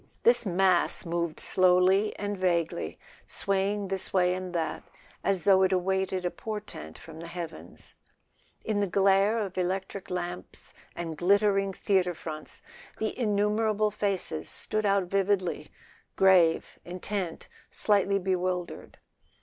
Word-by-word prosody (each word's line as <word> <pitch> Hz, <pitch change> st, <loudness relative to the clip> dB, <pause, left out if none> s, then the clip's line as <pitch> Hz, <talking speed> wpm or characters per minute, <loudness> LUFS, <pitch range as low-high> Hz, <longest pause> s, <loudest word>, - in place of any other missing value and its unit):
This 235 Hz, -1 st, +4 dB
mass 185 Hz, -1 st, +2 dB
moved 170 Hz, -1 st, -2 dB
slowly 185 Hz, +3 st, +3 dB
and 205 Hz, 0 st, -3 dB
vaguely, 175 Hz, -3 st, -1 dB, 0.3 s
swaying 200 Hz, 0 st, -1 dB
this 190 Hz, -1 st, -2 dB
way 180 Hz, -1 st, +3 dB
and 185 Hz, 0 st, -5 dB
that, 165 Hz, -1 st, -2 dB, 0.4 s
as 190 Hz, -4 st, +1 dB
though 190 Hz, 0 st, +5 dB
it 190 Hz, 0 st, +3 dB
awaited 190 Hz, 0 st, 0 dB
a 175 Hz, -, 0 dB
portent 210 Hz, -, -7 dB
from 160 Hz, -1 st, -12 dB
the 170 Hz, -, -7 dB
heavens. 170 Hz, -1 st, -8 dB, 0.7 s
In 215 Hz, -2 st, 0 dB
the 200 Hz, -, +1 dB
glare 195 Hz, +3 st, +3 dB
of 195 Hz, -4 st, -3 dB
electric 190 Hz, +1 st, -3 dB
lamps 180 Hz, 0 st, -6 dB, 0.2 s
and 165 Hz, -2 st, -4 dB
glitter¬ 200 Hz, +2 st, +4 dB
ing 195 Hz, -1 st, -3 dB
theatre 185 Hz, -3 st, +1 dB
fronts 155 Hz, -1 st, -8 dB, 0.3 s
the 220 Hz, -, -2 dB
innumerable 210 Hz, -1 st, +1 dB
faces 195 Hz, -6 st, -2 dB
stood 215 Hz, -1 st, -2 dB
out 200 Hz, -1 st, +3 dB
vividly, 185 Hz, -4 st, 0 dB, 0.5 s
grave, 180 Hz, -4 st, +4 dB
intent, 180 Hz, 0 st, -4 dB, 0.2 s
slightly 200 Hz, -1 st, +2 dB
bewildered. 185 Hz, -1 st, -2 dB
190 Hz, 125 wpm, -28 LUFS, 180-200 Hz, 0.7 s, though